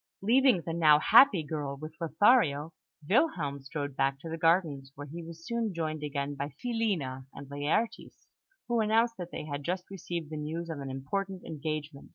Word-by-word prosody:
Leaving 245 -4 +4
the 165 - -3
now 155 -3 +6
happy 205 - +6
girl 145 -2 -4
with 155 +2 -8
Lothario, 165 - +3 0.3
Wilhelm 190 - +1
strolled 145 0 -5
back 135 0 +1
to 165 - -8
the 165 - -4
gardens, 160 -5 +2
where 145 - -7
he 165 +4 -8
was 165 0 -10
soon 230 -3 -2
joined 155 -2 -2
again 145 -1 -3
by 140 0 -5
Filina 185 - -2
and 140 - -9
Laertes, 145 +11 -2 0.4
who 240 -1 +1
announced 225 +2 +2
that 175 -1 -5
they 150 - -6
had 145 -1 -5
just 180 +3 -3
received 170 -4 -5
the 155 - -4
news 165 +3 -4
of 155 - -5
an 135 -1 -5
important 185 +9 -4
engagement. 155 -2 -5
160 Hz, 180 wpm, -30 LUFS, 145-190 Hz, 0.4 s, now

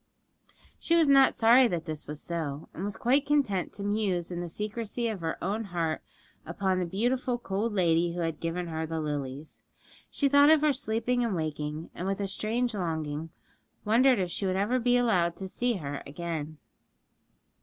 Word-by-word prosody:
She 335 - +2
was 330 -2 +4
not 275 -1 +6
sorry 240 +3 +6
that 175 -6 -3
this 155 -2 -5
was 150 0 -5
so, 155 -4 -4
and 180 - -6
was 205 0 -3
quite 270 +4 +2
content 275 -11 +1
to 200 - -6
muse 200 -4 -1
in 175 0 -3
the 175 - -5
secrecy 215 +5 -3
of 215 -5 -4
her 160 -1 -2
own 210 +5 -1
heart 170 -4 -2 0.4
upon 185 +2 -1
the 180 - -1
beautiful 245 +6 0
cold 220 0 -2
lady 170 -2 +2
who 175 - -2
had 165 -2 -2
given 170 +2 -3
her 160 -1 -3
the 160 0 -3
lilies. 145 -1 -5 0.5
She 285 - +1
thought 285 +1 +6
of 315 -1 +6
her 300 -1 +3
sleeping 245 -1 0
and 225 -5 -1
waking, 155 -1 -4
and 180 - -5
with 195 0 -1
a 200 - -1
strange 225 +5 -1
longing 160 -4 -3 0.6
wondered 245 +4 +4
if 180 -3 -1
she 195 - -2
would 185 - 0
ever 210 +7 +1
be 245 +1 +3
allowed 180 -8 +2
to 190 - -6
see 245 +5 0
her 145 -6 -5
again. 155 0 -5
190 Hz, 185 wpm, -28 LUFS, 165-235 Hz, 0.6 s, not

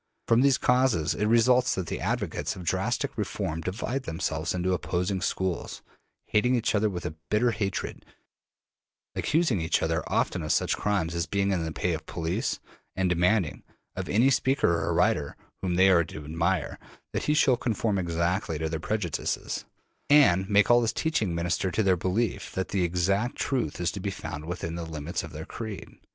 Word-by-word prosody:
From 115 +1 +5
these 140 -1 +4
causes 125 -11 +2
it 105 - 0
results 125 +3 +4
that 95 - -2
the - - -4
advocates - - -2
of 90 - -8
drastic 85 - -1
reform 80 +1 -2
divide 115 +9 -3
themselves 80 -5 -2
into 90 +1 0
opposing 90 +2 -1
schools, 95 -1 -2 0.4
hating 125 +4 +2
each 115 - +1
other 105 0 +2
with 90 -3 -5
a - - -3 0.2
bitter 120 +3 +3
hatred, 105 -3 -3 1.1
accusing 150 - +1
each 80 - +1
other - - +1
often - - 0
of - - -2
such - - +2
crimes 95 -5 0
as 85 0 -1
being 100 +2 +1
in 90 -4 0
the 80 - -3
pay 90 +2 -1
of 80 - -4
the - - -12
police, 85 0 -2 0.4
and 95 -1 +1
demanding, 90 +1 +1 0.3
of - - -4
any 120 +7 +4
speaker 135 -6 +2
or - - 0
writer - - +1 0.2
whom 90 -2 -1
they 95 +2 +6
are 85 -2 +5
to 80 -2 -9
admire, 85 +5 -1 0.3
that - - -2
he 150 - +2
shall 135 -4 +5
conform 110 -4 -1
exactly 85 +2 -1
to 80 +1 -2
their 80 0 -3
prejudices, 95 -3 -2 0.4
and 95 -11 +5
make 100 +2 +4
all 120 0 +6
his 115 -1 +1
teaching 110 - 0
minister 85 +2 0
to 90 +5 0
their 95 -2 +4
belief 95 +6 -1
that 95 - -2
the 95 -2 +1
exact 95 +7 0
truth 120 - -1
is 85 -1 0
to 100 - -6
be 100 - -2
found 75 -5 -6
within 85 -1 -4
the 85 0 -4
limits 80 0 -4
of - - -9
their - - -7
creed. 110 -5 -7
95 Hz, 185 wpm, -27 LUFS, 85-110 Hz, 1.1 s, they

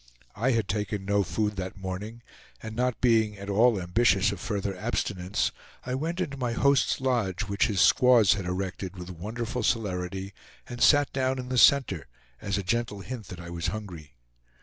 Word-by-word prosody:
I 120 +5 +1
had 115 -4 0
taken 105 -1 -3
no 100 +1 +2
food 105 +3 -2
that 95 +1 -5
morning, 100 +5 -6 0.4
and 110 0 -6
not 125 0 0
being 110 -4 +3
at 100 +1 -5
all 110 +1 +4
ambitious 100 +2 +2
of 100 - -6
further 100 -2 -3
abstinence, 95 -2 -1 0.3
I 125 - -3
went 165 +7 -2
into 145 -7 -3
my 125 -3 -2
host's 140 +3 +2
lodge, 120 -9 0
which 100 -1 +1
his 100 -3 +1
squaws 120 -5 +6
had 95 -3 -4
erected 95 +1 -4
with 90 0 -7
wonderful 115 +7 -4
celerity, 95 -3 -2 0.3
and 120 -1 -7
sat 145 -1 +5
down 130 0 0
in 125 0 -6
the 130 - -1
center, 140 - +4 0.3
as 100 -1 -1
a 100 - -2
gentle 110 +1 -1
hint 115 -3 -7
that 90 -1 -9
I 85 0 -8
was 85 0 -3
hungry. 85 -6 -7
105 Hz, 180 wpm, -27 LUFS, 95-120 Hz, 0.4 s, squaws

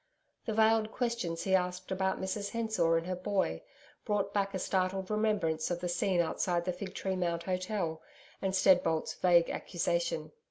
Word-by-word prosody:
The 220 - 0
veiled 220 0 +3
questions 235 -10 -2
he 190 - 0
asked 180 0 0
about 190 0 0
Mrs 200 +2 -3
Hensor 220 -8 +1
and 165 - -2
her 185 0 -2
boy, 180 - -1 0.4
brought 200 -1 -1
back 200 -1 0
a - - +1
startled 190 +1 -1
remembrance 205 -8 +1
of 175 -1 -1
the 175 0 -3
scene 175 0 +2
outside 170 +1 0
the 180 - 0
Fig 190 +1 -7
Tree 190 -1 -2
Mount 170 -2 -1
Hotel 185 -3 -2 0.4
and 190 -1 -1
Steadbolt's 180 -4 +3
vague 175 -2 +4
accusation. 170 -3 -1
185 Hz, 165 wpm, -31 LUFS, 170-200 Hz, 0.4 s, vague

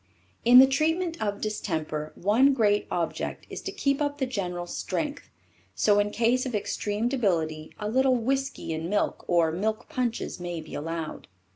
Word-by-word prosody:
In 245 +1 +8
the 260 - +11
treatment 325 +5 0
of 205 -1 -2
distemper, 160 -7 -3
one 245 +9 +4
great 210 -4 +2
object 170 -2 -3
is - - -5
to 390 - -4
keep 280 -7 0
up 290 -1 -1
the 270 - 0
general 180 -8 -3
strength, 285 - -4 0.5
so 205 -1 +4
in 205 0 +2
case 235 +4 +2
of 250 -4 -3
extreme 210 +2 -1
debility 165 - -1
a 210 - -3
little 260 +3 +3
whisky 270 -5 -1
in 160 +2 -4
milk 205 +1 0
or 170 -2 +3
milk 215 +6 -2
punches 240 -6 -2
may 175 -1 -4
be 155 - -10
allowed. 165 +1 -5
215 Hz, 165 wpm, -27 LUFS, 175-265 Hz, 0.5 s, the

